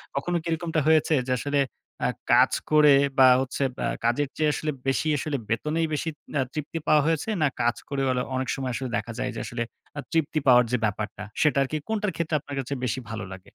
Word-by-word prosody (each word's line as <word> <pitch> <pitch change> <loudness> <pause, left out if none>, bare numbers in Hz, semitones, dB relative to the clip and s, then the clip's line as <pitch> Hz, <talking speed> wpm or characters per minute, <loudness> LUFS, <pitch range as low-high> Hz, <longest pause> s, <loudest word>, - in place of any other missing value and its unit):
কখনো 175 +6 -1
কি - - -22
এরকমটা 160 0 -1
হয়েছে 160 0 +4
যে, - - -1
আসলে 145 0 0 0.4
অ্যা - - +1 0.2
কাজ - - +6 0.2
করে 150 -2 +7 0.3
বা 130 - +9
হচ্ছে 135 +1 -2
বা - - -2
আ - - -6
কাজের 135 +4 +1
চেয়ে 155 -1 +2
আসলে 155 0 -2 0.2
বেশিই 150 +3 +1
আসলে 145 0 -2
বেতনেই 155 +8 0
বেশি 160 +2 -1 0.3
আ - - +3
তৃপ্তি 155 +2 -4
পাওয়া 150 -1 +5
হয়েছে? 165 +6 0
না 150 - +4
কাজ 120 0 +2
করে 140 -1 -1
ওলে 125 0 +1
অনেক 130 0 -1
সময় 130 -2 -3
আসলে 130 +1 -3
দেখা 110 +3 -5
যায় 130 - -1
যে, - - -4
আসলে 120 0 -3 0.3
অ - - -2
তৃপ্তি 160 -1 +1
পাওয়ার 125 -1 +7
যে 125 - +2
ব্যাপারটা 105 0 -3 0.2
সেটা 150 -2 +3
আরকি, 155 +3 -3
কোনটার 210 -3 -1
ক্ষেত্রে 160 -2 -1
আপনার 140 +1 -8
কাছে 135 +2 -3
বেশি 125 +1 -1
ভালো 110 -3 -5
লাগে? 95 0 -10
140 Hz, 215 wpm, -26 LUFS, 125-155 Hz, 0.4 s, বা